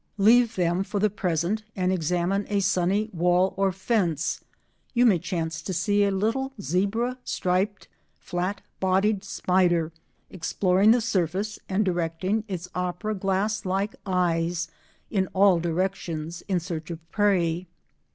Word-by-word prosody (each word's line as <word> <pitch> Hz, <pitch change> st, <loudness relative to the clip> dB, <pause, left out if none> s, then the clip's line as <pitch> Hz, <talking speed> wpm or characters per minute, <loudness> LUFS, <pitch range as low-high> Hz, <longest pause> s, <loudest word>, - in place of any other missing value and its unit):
Leave 230 Hz, +3 st, +5 dB
them 175 Hz, +1 st, +1 dB
for 205 Hz, +1 st, -3 dB
the 210 Hz, 0 st, +2 dB
present 180 Hz, +1 st, -1 dB
and 185 Hz, 0 st, +1 dB
examine 180 Hz, +3 st, 0 dB
a 205 Hz, -1 st, +1 dB
sunny 195 Hz, +3 st, +1 dB
wall 180 Hz, +2 st, +2 dB
or 195 Hz, 0 st, +2 dB
fence. 180 Hz, -, 0 dB, 0.5 s
You 245 Hz, +1 st, +5 dB
may 200 Hz, -7 st, +5 dB
chance 165 Hz, -1 st, -3 dB
to 190 Hz, -, -4 dB
see 205 Hz, +4 st, +2 dB
a 200 Hz, -, +3 dB
little 225 Hz, +8 st, -1 dB
zebra 200 Hz, -, 0 dB
striped, 190 Hz, +3 st, -1 dB, 0.3 s
flat 185 Hz, +2 st, -3 dB, 0.2 s
bodied 195 Hz, +2 st, +2 dB
spider 180 Hz, -4 st, +1 dB, 0.4 s
exploring 185 Hz, +2 st, +2 dB
the 235 Hz, +2 st, +5 dB
surface 205 Hz, -1 st, -1 dB
and 200 Hz, +2 st, +1 dB
directing 180 Hz, +4 st, -1 dB
its 180 Hz, -3 st, -5 dB
opera 180 Hz, +4 st, -2 dB
glass 200 Hz, +2 st, 0 dB
like 195 Hz, +2 st, -1 dB
eyes 170 Hz, -2 st, 0 dB, 0.4 s
in 190 Hz, -3 st, +1 dB
all 190 Hz, -2 st, +5 dB
directions 170 Hz, -1 st, -2 dB
in 190 Hz, -3 st, +1 dB
search 165 Hz, -2 st, -5 dB
of 170 Hz, -, -4 dB
prey. 180 Hz, -4 st, +1 dB
185 Hz, 135 wpm, -26 LUFS, 175-205 Hz, 0.5 s, Leave